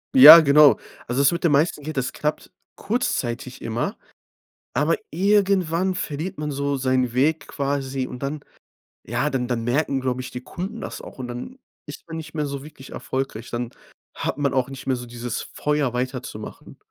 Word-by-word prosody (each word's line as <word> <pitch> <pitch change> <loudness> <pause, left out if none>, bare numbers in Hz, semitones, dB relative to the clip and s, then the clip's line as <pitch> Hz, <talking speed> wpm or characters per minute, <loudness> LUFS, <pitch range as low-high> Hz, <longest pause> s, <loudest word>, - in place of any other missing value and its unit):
Ja, 260 -10 +13
genau. 150 -1 +6 0.3
Also, 125 +3 +1
das 140 - +5
mit 170 +1 -3
dem 170 - +4
meisten 150 +1 +2
Geld, 155 0 -6
das 130 0 -1
klappt 150 0 -3 0.2
kurzzeitig 130 - -2
immer, 115 +1 -2 0.8
aber 150 +5 +2
irgendwann 190 -1 +2
verliert 160 0 -4
man 150 0 -3
so 140 0 -1
seinen 130 -2 0
Weg 145 +3 +2
quasi 135 -2 -2
und 125 - -9
dann 145 +2 -3 0.6
ja - - -1
dann 125 -2 -1
dann 120 -2 -1
merken, 135 +3 0
glaube 130 -1 -1
ich, 130 - -8
die 125 - -6
Kunden 195 - -6
das - - -6
auch - - -12
und 125 - -4
dann 125 - -7 0.3
ist 145 +2 -10
man 165 -1 -6
nicht 160 -1 -8
mehr 150 -2 -1
so 140 -1 -5
wirklich 145 -3 -12
erfolgreich. 130 -3 -4
Dann 120 0 -3 0.5
hat - - -3
man 140 -2 0
auch 130 0 +1
nicht 135 -1 -9
mehr 130 - +2
so 125 0 -7
dieses 120 -1 -5
Feuer 150 -4 -1
weiterzumachen. 125 -3 -5
140 Hz, 180 wpm, -23 LUFS, 125-155 Hz, 0.8 s, Ja